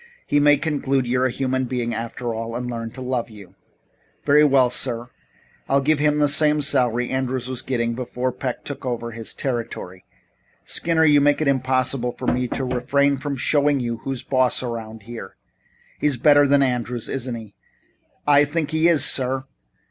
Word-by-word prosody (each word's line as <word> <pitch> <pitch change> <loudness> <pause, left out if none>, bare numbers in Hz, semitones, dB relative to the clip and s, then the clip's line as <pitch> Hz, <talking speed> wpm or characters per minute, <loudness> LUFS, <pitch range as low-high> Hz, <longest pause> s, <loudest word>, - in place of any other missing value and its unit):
He 145 - +2
may 145 0 +5
conclude 140 -3 0
you're 125 +1 +1
a - - -2
human 130 +1 -1
being, 120 -1 -2
after 115 +1 -4
all, 115 +1 -5
and 125 +1 -3
learn 115 -2 -4
to 130 - -7
love 125 -2 -2
you?" 100 -4 -14 0.7
"Very 150 +1 +5
well, 135 -4 +4
sir. 120 -1 -1 0.6
I'll 140 - +4
give 145 +2 +1
him 150 0 +2
the 150 -1 +3
same 150 +1 +3
salary 125 -3 +1
Andrews 130 -1 -2
was 130 -1 -4
getting 115 -2 -1
before 125 +1 -3
Peck 125 0 -5
took 145 -1 -7
over 120 -2 -3
his 115 -1 -7
territory." 115 -8 -4 0.6
"Skinner, 160 - +1
you 145 -2 +5
make 145 0 +3
it 155 - 0
impossible 130 -2 +1
for - - -8
me 125 0 +1
to 135 - -3
refrain 135 +3 +1
from 140 +1 -4
showing 145 +1 +2
you 120 -2 -3
who's 130 +2 -5
boss 130 -1 +1
around 110 -3 -6
here. 115 -3 -9 0.6
He's 145 -4 +1
better 145 +2 +5
than 140 0 +4
Andrews, 125 -2 -2
isn't 130 -2 -3
he?" 110 -3 -10 0.7
"I 145 0 +6
think 150 +1 -2
he 160 +1 +3
is, 170 -4 +4
sir." 130 0 +1
130 Hz, 180 wpm, -22 LUFS, 120-140 Hz, 0.7 s, I